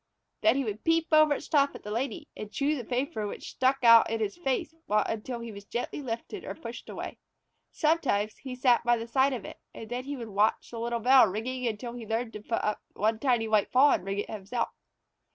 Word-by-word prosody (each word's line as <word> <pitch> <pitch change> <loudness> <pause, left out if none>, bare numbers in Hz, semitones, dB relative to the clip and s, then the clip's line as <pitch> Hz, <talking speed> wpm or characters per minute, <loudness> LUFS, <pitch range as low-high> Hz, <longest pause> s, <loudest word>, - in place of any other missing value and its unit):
Then 325 - +4
he 275 - +1
would 215 -2 -5
peep 330 0 +2
over 310 -1 +6
its - - -7
top 285 -2 +3
at - - -10
the 210 - -6
Lady 275 - -3
and 210 -1 -7
chew 290 +5 0
the 255 - -4
paper 245 -2 -2
which - - -7
stuck 260 +1 +1
out 230 -1 +8
in 225 0 -1
his 210 -2 -2
face 275 -2 -2 0.2
until 225 +3 -1
he 235 -1 -6
was 200 -1 -10
gently 240 +7 -4
lifted 255 - -5
or - - -6
pushed 235 -6 -9
away. - - -6 0.5
Sometimes 275 -10 +1
he 260 -2 -7
sat 250 -1 +3
by 240 0 +3
the 230 - -5
side 265 +4 +2
of 245 -6 -4
it, - - -9 0.2
and 225 +1 -9
then 250 +1 -3
he 285 0 -4
would 230 -3 -7
watch 205 +2 +1
the 230 - -6
little 235 0 -2
bell 255 0 +7
ringing 245 +6 -3
until 235 +2 -4
he 240 -2 -8
learned 225 +1 -2
to 210 - -7
put 225 +2 -2
up 210 - -1
one 220 +2 0
tiny 240 -4 +2
white 215 -2 +2
paw 275 +3 +6
and - - +1
ring 195 +1 -3
it 205 - -2
himself. 215 +3 -3
235 Hz, 230 wpm, -28 LUFS, 220-270 Hz, 0.5 s, out